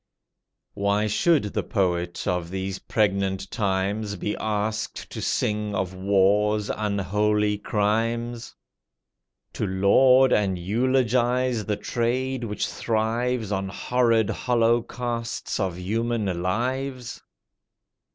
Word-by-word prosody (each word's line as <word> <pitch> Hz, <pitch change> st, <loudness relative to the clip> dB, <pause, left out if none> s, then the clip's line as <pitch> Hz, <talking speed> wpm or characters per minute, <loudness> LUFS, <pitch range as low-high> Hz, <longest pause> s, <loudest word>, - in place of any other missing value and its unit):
Why 100 Hz, +1 st, +1 dB
should 145 Hz, +8 st, +3 dB
the -, -, 0 dB
poet 90 Hz, -5 st, -1 dB
of 90 Hz, -2 st, -1 dB
these 95 Hz, +1 st, -4 dB
pregnant 95 Hz, -2 st, 0 dB
times 100 Hz, 0 st, -1 dB
Be 105 Hz, +2 st, -3 dB
asked 110 Hz, +1 st, -3 dB
to -, -, -5 dB
sing 105 Hz, -1 st, -1 dB
of 95 Hz, -1 st, -2 dB
war's 100 Hz, +2 st, +2 dB
unholy 105 Hz, +1 st, 0 dB
crimes? 115 Hz, +3 st, -1 dB, 1.0 s
To 105 Hz, -, -2 dB
laud 125 Hz, +8 st, +5 dB
and 100 Hz, -3 st, +1 dB
eulogize 120 Hz, +3 st, +1 dB
the 105 Hz, -1 st, 0 dB
trade 125 Hz, +2 st, -1 dB
which 105 Hz, -2 st, -2 dB
thrives 115 Hz, 0 st, -1 dB
On 95 Hz, -1 st, -1 dB
horrid 115 Hz, 0 st, +1 dB
holocausts 120 Hz, 0 st, -1 dB
of 95 Hz, -3 st, -1 dB
human 105 Hz, -1 st, -1 dB
lives? 125 Hz, +6 st, -2 dB
105 Hz, 100 wpm, -25 LUFS, 100-120 Hz, 1.0 s, laud